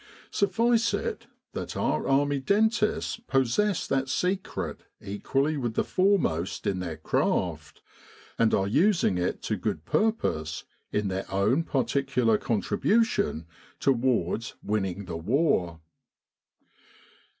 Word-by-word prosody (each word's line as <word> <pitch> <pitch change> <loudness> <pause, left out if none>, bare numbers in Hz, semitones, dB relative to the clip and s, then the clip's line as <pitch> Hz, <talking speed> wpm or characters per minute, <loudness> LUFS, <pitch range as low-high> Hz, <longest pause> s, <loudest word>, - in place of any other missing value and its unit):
Suffice 230 +3 +2
it 460 -2 -4 0.3
that - - -5
our - - 0
Army 140 +1 +2
dentists 215 - +1
possess 135 - +1
that 135 0 0
secret 185 +8 -2 0.2
equally 135 +9 -1
with 120 -5 -2
the - - +2
foremost 165 - +1
in 95 -2 0
their 85 -4 -4
craft, 80 - -1 0.6
and 115 -1 +4
are 95 - +2
using 160 - +3
it 90 - -2
to - - -1
good - - -3
pur 220 +1 +3
pose 80 - -3 0.3
in 105 -1 0
their 95 +1 -4
own 100 +10 +2
particular 130 -4 +1
contribution 200 - +1 0.3
towards 115 -5 +1
winning 100 -2 -2
the 85 -2 -5
war. 90 - +1
130 Hz, 115 wpm, -27 LUFS, -, 0.6 s, and